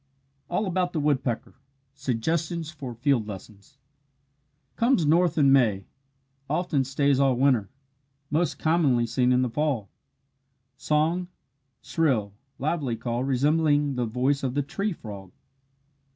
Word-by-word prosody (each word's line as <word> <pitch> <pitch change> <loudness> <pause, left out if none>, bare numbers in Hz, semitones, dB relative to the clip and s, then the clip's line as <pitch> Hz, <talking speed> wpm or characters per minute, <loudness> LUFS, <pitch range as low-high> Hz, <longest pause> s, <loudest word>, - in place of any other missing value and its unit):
ALL 205 +5 0
ABOUT 180 -1 -1
THE 160 - -1
WOODPECKER 135 -5 -1 0.4
SUGGESTIONS 155 +5 -2
FOR 135 -6 -7
FIELD 120 -2 +1
LESSONS 100 +5 -11 1.0
Comes 230 - +2
north 170 +2 +3
in 140 -3 +5
May 110 -8 +3 0.6
often 155 -3 0
stays 140 +1 +1
all 135 -2 +3
winter 125 -6 +2 0.6
most 165 +3 0
commonly 150 -7 +2
seen 125 +2 +1
in 125 0 +3
the 125 - 0
fall. 130 -7 -1 0.8
Song 160 +6 0 0.6
shrill, 125 -11 0 0.2
lively 145 -4 -1
call 120 +1 -3
resembling 145 +2 +2
the 125 -2 -1
voice 130 +5 0
of 130 -1 -2
the 145 - +1
tree 200 +9 -2
frog. 100 - -9
140 Hz, 125 wpm, -26 LUFS, 125-155 Hz, 1.0 s, in